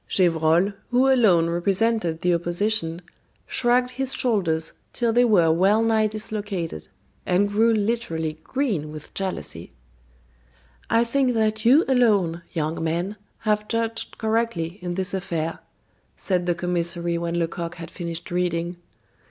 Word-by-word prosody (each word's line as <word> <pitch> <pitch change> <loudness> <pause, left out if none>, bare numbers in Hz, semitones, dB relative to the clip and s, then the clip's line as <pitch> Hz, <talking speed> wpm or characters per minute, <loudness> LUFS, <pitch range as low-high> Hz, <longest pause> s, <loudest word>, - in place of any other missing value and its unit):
Gevrol, 170 +1 +3 0.2
who 260 +2 +4
alone 185 -10 +4
represented 185 -1 0
the 180 0 +2
opposition, 175 0 -1 0.4
shrugged 250 0 +2
his 265 +1 -2
shoulders 165 -9 0 0.2
till 235 -2 0
they 245 +1 +5
were 185 -9 +4
well 195 +7 +3
nigh 220 -1 +3
dislocated, 205 - -4 0.4
and 185 +3 +2
grew 220 +3 +3
literally 200 -8 -1
green 210 - -2
with 155 -1 -10
jealousy. 190 -1 -4 1.2
"I 230 - +4
think 250 +1 +1
that 220 -1 0
you 275 +8 +6
alone, 205 -10 +2
young 160 0 -2
man, 170 +5 -1 0.3
have 210 -1 0
judged 230 0 -1
correctly 220 -6 -1
in 175 -1 -3
this 190 +1 -1
affair," 165 -4 -3 0.6
said 180 -2 -1
the 175 - +2
commissary 170 -1 -1
when 170 0 -2
Lecoq 170 0 -3
had 165 -1 -9
finished 170 -2 -6
reading. 175 -1 -1
190 Hz, 130 wpm, -24 LUFS, 170-225 Hz, 1.2 s, you